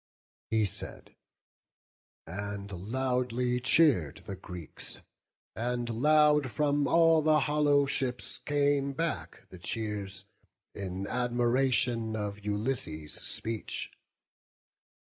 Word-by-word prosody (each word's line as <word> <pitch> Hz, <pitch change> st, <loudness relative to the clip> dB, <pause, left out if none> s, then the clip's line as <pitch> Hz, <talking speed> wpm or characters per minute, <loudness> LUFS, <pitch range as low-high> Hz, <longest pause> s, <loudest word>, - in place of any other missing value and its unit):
He 110 Hz, -1 st, +2 dB
said, 100 Hz, -, -8 dB, 1.1 s
and 100 Hz, +2 st, -5 dB
loudly 125 Hz, +4 st, -1 dB
cheer'd 135 Hz, -, +3 dB
the 100 Hz, -, -5 dB
Greeks—and 115 Hz, +7 st, -7 dB
loud 150 Hz, +3 st, +4 dB
From 145 Hz, +1 st, +1 dB
all 165 Hz, -1 st, +5 dB
the 155 Hz, -1 st, +4 dB
hollow 145 Hz, -1 st, +3 dB
ships 130 Hz, -2 st, -2 dB
came 145 Hz, -1 st, +1 dB
back 110 Hz, -, -3 dB
the 95 Hz, -, -11 dB
cheers— 100 Hz, -1 st, -4 dB, 0.5 s
In 95 Hz, 0 st, -4 dB
admiration 120 Hz, -1 st, +1 dB
of 105 Hz, -1 st, -4 dB
Ulysses' 105 Hz, -, -2 dB
speech. 115 Hz, -1 st, -3 dB
120 Hz, 90 wpm, -30 LUFS, 100-140 Hz, 1.1 s, all